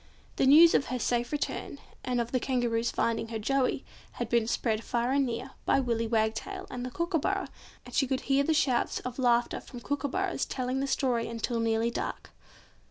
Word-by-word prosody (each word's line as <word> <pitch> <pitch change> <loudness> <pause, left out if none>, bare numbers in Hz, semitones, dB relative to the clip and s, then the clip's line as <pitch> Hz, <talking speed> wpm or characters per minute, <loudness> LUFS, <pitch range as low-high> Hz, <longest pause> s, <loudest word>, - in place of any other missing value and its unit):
The 265 - +3
news 325 +4 +8
of - - +2
her 255 - -2
safe 240 0 0
return, 290 -1 -3 0.3
and 250 -1 0
of 235 0 -2
the 255 - +1
Kangaroo's 240 -3 0
finding 230 -1 0
her 225 0 -4
Joey, 265 +4 0 0.3
had 240 -2 -4
been 235 -2 +2
spread 225 -1 0
far 240 0 0
and 275 -1 +2
near, 230 -1 -4
by - - +3
Willy 230 -3 0
Wagtail 225 - -1
and 245 -1 -5
the 255 - -3
Kookooburra; 340 +6 -1 0.4
and - - -12
she 270 - +2
could 260 0 -1
hear 275 0 +2
the 320 - +1
shouts 255 -5 +1
of 250 +1 -6
laughter 240 -1 +2
from 245 - -10
kookooburras 285 +8 -1
telling 255 0 -2
the 275 - -1
story 250 -4 0
until 230 +1 -2
nearly 230 +1 +1
dark. - - -5
250 Hz, 190 wpm, -29 LUFS, 235-275 Hz, 0.4 s, news